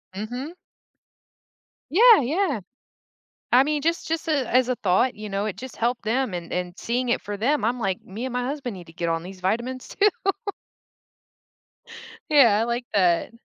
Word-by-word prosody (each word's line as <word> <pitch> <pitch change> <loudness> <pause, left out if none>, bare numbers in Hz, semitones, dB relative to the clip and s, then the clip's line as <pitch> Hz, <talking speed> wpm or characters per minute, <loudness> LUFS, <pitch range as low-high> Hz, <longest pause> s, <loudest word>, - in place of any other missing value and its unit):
Mhm. 245 - -5 1.4
Yeah, 445 - +7
yeah. 295 - 0 0.9
I 250 +2 +7
mean, 295 0 -1
just 335 +1 -1
just, 325 0 -2
uh, - - +2
as 255 -2 +2
a 255 - +1
thought, 195 +7 +2
you 210 0 -7
know, 200 +1 -2
it 200 - -4
just 255 +3 -9
helped 240 +1 -1
them 230 -2 0
and 170 -1 -6
and 180 -1 -3
seeing 245 +2 -1
it - - +1
for 205 0 -5
them. 260 +4 +1
I'm 245 +2 0
like, 195 -4 -1
"Me 220 +7 -6
and 255 - -5
my 250 0 -1
husband 265 -5 -4
need 175 -2 -11
to - - -13
get 170 0 -3
on 165 0 -1
these 185 +1 -10
vitamins 240 +7 -2
too." 410 +1 +3 2.2
Yeah, 240 -9 +6
I - - +2
like 235 +1 -2
that. 180 0 +2
240 Hz, 180 wpm, -24 LUFS, 200-270 Hz, 2.2 s, Yeah